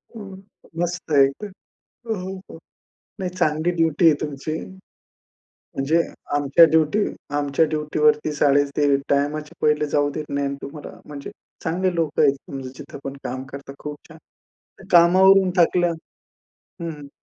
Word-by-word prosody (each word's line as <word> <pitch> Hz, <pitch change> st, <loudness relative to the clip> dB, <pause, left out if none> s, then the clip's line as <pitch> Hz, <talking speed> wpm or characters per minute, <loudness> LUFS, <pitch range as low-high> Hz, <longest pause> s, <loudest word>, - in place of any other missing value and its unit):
हं, 200 Hz, -3 st, -9 dB, 0.5 s
मस्त 175 Hz, -1 st, -3 dB
आहे 140 Hz, -2 st, +6 dB
तर. 210 Hz, -1 st, -6 dB, 0.6 s
हो, 225 Hz, -, -1 dB
हो, 190 Hz, 0 st, -6 dB
हो -, -, -10 dB, 0.6 s
नाही 185 Hz, -1 st, -2 dB
चांगली 165 Hz, -2 st, 0 dB
ड्युटी 165 Hz, 0 st, +2 dB
आहे 160 Hz, -, +7 dB
तुमची. 150 Hz, +1 st, -4 dB, 1.2 s
म्हणजे 150 Hz, +5 st, +1 dB, 0.4 s
आमच्या 145 Hz, +3 st, +6 dB
ड्युटी 160 Hz, +5 st, +2 dB, 0.4 s
आमच्या 145 Hz, +2 st, +2 dB
ड्युटीवरती 150 Hz, 0 st, +1 dB
साडे 145 Hz, -1 st, +3 dB
ते 145 Hz, -2 st, +3 dB
टाईमच्या 150 Hz, +2 st, 0 dB
पहिले 150 Hz, 0 st, +2 dB
जाऊ 145 Hz, 0 st, +2 dB
देत 155 Hz, +1 st, -4 dB
नाही 140 Hz, 0 st, -1 dB
ना 140 Hz, -, -4 dB
तुम्हाला. 145 Hz, +2 st, -9 dB
म्हणजे 145 Hz, -2 st, -8 dB, 0.3 s
चांगले 180 Hz, +3 st, 0 dB
लोकं 165 Hz, -3 st, 0 dB
आहेत 135 Hz, 0 st, 0 dB, 0.2 s
जिथे -, -, -10 dB
पण 135 Hz, 0 st, -5 dB
काम 130 Hz, +1 st, -4 dB
करता. 140 Hz, 0 st, -8 dB
खूप 150 Hz, 0 st, -6 dB
छान. 160 Hz, -1 st, -14 dB, 0.7 s
कामावरून 185 Hz, +2 st, +6 dB
थकल्या 175 Hz, 0 st, +3 dB, 0.7 s
हं, 170 Hz, -, -9 dB
हं. 145 Hz, -2 st, -10 dB
150 Hz, 140 wpm, -22 LUFS, 145-170 Hz, 1.2 s, आहे